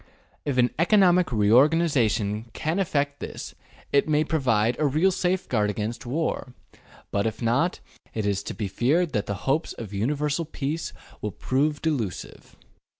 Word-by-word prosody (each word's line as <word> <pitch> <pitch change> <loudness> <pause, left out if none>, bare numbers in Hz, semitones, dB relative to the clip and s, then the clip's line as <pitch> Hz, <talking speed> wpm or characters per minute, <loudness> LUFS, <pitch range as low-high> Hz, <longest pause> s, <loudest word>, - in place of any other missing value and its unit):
If 140 -3 -1
an 125 -1 +4
economic 180 -2 +4
reorganization 115 -2 +3
can 160 +9 -1
effect 145 -6 0
this - - -7 0.4
it 140 +2 +3
may 150 0 +3
pro 160 0 -1
vide 115 -3 +2
a 155 - +3
real 155 +8 +3
safeguard 175 - 0
against 110 +4 -4
war, 135 -2 -2 0.6
but 100 +2 +1
if 110 - -4
not, 125 +10 +1 0.3
it 110 -2 -1
is 100 -1 0
to - - -5
be 105 - -3
feared 150 - +1
that 105 -2 -1
the 100 - -2
hopes 145 +5 0
of 105 -3 -8
universal 145 +9 0
peace 155 +1 -3 0.3
will 105 - -2
prove 145 - -1
delusive. 130 - -3
135 Hz, 150 wpm, -25 LUFS, 110-160 Hz, 0.6 s, an